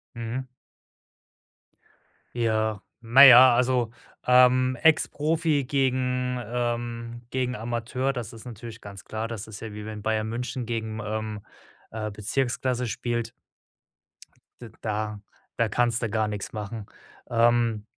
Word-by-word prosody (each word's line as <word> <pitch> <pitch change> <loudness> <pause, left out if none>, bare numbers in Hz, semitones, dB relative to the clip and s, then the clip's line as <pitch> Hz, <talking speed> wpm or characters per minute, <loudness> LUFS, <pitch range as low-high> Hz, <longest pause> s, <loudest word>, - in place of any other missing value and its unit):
Mhm. 120 +3 -4 1.9
Ja, 110 -3 0 0.2
na 120 +4 +7
ja, 130 -2 +10
also, 125 -2 +1 0.3
ähm, 125 0 +5
Ex-Profi 155 -1 +2
gegen 125 -1 0
ähm, 120 0 -3
gegen 125 -1 -1
Amateur, 120 +4 -2
das 120 -3 -6
ist 115 +1 -11
natürlich 115 -1 -9
ganz 100 -1 -10
klar, 110 +1 -4
das 115 -3 -6
ist 110 -2 -9
ja 110 -1 -7
wie 105 0 -7
wenn 110 -1 -7
Bayern 110 0 -1
München 125 +2 -4
gegen, 110 -1 -4
ähm, 110 -1 -4 0.5
äh, 110 -1 -4
Bezirksklasse 125 +3 -1
spielt. 120 0 -3 1.3
D 120 - -9
da 105 -1 -3 0.4
da 115 -2 +1
kannst 120 +1 +1
du 115 - -1
gar 110 0 0
nichts 105 -2 -5
machen. 105 0 -6 0.4
Ähm 115 -2 +2
115 Hz, 125 wpm, -26 LUFS, 110-125 Hz, 1.9 s, ja